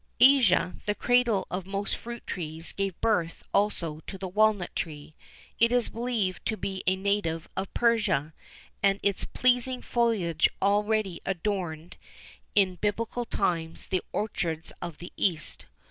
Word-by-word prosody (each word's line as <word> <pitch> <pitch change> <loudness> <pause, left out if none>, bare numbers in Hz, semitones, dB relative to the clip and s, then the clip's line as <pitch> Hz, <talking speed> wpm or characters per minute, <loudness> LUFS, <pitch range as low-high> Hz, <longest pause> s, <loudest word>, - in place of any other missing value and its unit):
Asia, 240 -10 +6
the 210 - +1
cradle 240 -5 +3
of 185 0 -3
most 200 +1 -2
fruit 235 0 -8
trees, 160 -2 -3
gave 195 -3 -2
birth 180 -7 +1
also 170 -7 +1
to 195 - -6
the 190 0 -4
walnut 210 -1 +2
tree. 155 -2 -5 0.5
It 230 +1 +5
is 245 -2 +3
believed 230 -5 -2
to 220 - -1
be 190 -1 -3
a 185 - +4
native 190 -4 -1
of 195 - -3
Persia,[XIV 225 -10 +3
10] - - -37 0.5
and 195 0 +3
its 200 -2 +2
pleasing 250 0 +1
foliage 210 -10 +2
already 205 -1 +1
adorned, 175 -4 -3 0.6
in 190 -3 +4
Biblical 230 +4 -1
times, 165 -6 -1
the 185 -2 +1
orchards 170 -6 -2
of 170 -3 -5
the 175 - -10
east. 165 -6 -1
195 Hz, 145 wpm, -28 LUFS, 175-220 Hz, 0.6 s, Asia